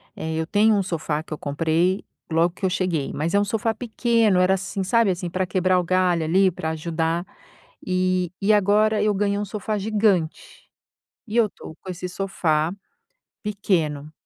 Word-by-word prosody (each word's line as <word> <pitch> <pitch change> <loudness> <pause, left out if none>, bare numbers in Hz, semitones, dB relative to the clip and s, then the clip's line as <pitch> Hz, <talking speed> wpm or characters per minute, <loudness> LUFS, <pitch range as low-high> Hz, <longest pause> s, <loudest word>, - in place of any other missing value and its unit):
eh, 160 0 -4
eu 160 0 -2
tenho 210 +3 +4
um 200 - +1
sofá 160 -4 -2
que 160 - -7
eu - - -5
comprei 165 +6 0 0.3
logo 165 +2 +3
que 190 - -4
eu - - +3
cheguei, 180 -6 -1
mas 160 +3 -2
é 200 - +4
um - - +2
sofá 225 +2 -1
pequeno, 225 -3 +1
era 185 +1 +4
assim, 190 +1 -4
sabe, 225 +1 +3
assim, 180 -1 -4
pra 185 +2 -1
quebrar 185 0 +2
o - - 0
galho 180 -1 +2
ali, 190 +5 +3
pra 160 -2 -4
ajudar. 165 +1 -2 0.6
E 185 -1 0
e 200 +2 +3
agora 210 +1 +3
eu 210 0 +2
ganhei 200 0 0
um 205 - -2
sofá 210 +1 -3
gigante 205 -5 -1 0.6
e 215 - -6
eu 225 -3 +4
tô 160 - -11
com 190 - -9
esse 180 0 -5
sofá 170 -4 0 0.7
pequeno. 165 -8 -1
185 Hz, 180 wpm, -23 LUFS, 165-205 Hz, 0.7 s, tenho